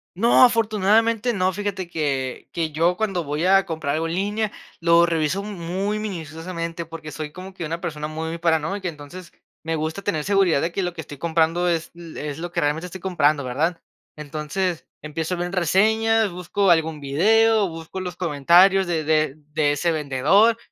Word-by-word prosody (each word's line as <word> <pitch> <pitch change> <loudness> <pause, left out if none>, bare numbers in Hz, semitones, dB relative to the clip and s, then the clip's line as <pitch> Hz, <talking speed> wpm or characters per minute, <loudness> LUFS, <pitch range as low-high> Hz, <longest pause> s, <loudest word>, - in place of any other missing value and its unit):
¡No!, 230 +7 +5
afortunadamente 225 0 +3
no, 185 -2 +1
fíjate 200 -3 -3
que 140 -6 -3
que 160 -2 -2
yo 170 +4 +1
cuando 195 -6 -1
voy 150 +3 -2
a 195 +1 +5
comprar 160 -5 -3
algo 160 +2 -1
en 165 - -3
línea, 205 +2 -1 0.3
lo 170 0 +5
reviso 165 +3 0
muy 195 +1 -3
minuciosamente, 170 -2 -5
porque 160 -1 -9
soy 155 0 -6
como 185 +4 -10
que 180 - -7
una 165 +2 -4
persona 155 -4 -4
muy 160 +2 -4
paranoica, 170 +3 0
entonces, 160 +3 -11 0.3
me 165 0 -2
gusta 160 +4 -3
tener 155 -7 -1
seguridad 195 -6 +2
de 170 - -1
que 195 - -2
lo 175 -1 -2
que 165 - -6
estoy 145 -1 -10
comprando, 170 +2 +1
es 165 -2 -2
lo 170 -1 -10
es 150 0 -5
lo 175 +1 -5
que - - -1
realmente 150 +4 -1
estoy 185 +1 -10
comprando, 155 -6 +1
¿verdad?, 155 +7 -1 0.4
entonces, 155 +4 -3 0.2
empiezo 160 +4 -3
a - - -8
ver 175 0 -3
reseñas, 220 +5 +2
busco 180 +2 +1
algún 160 -2 +1
video, 210 +9 +3
busco 165 +3 -7
los 180 -2 -5
comentarios 180 +4 +4
de 165 -2 -1
de 155 -2 +1 0.2
de 150 -1 +2
ese 170 +4 0
vendedor. 160 - +3
170 Hz, 180 wpm, -23 LUFS, 155-190 Hz, 0.4 s, No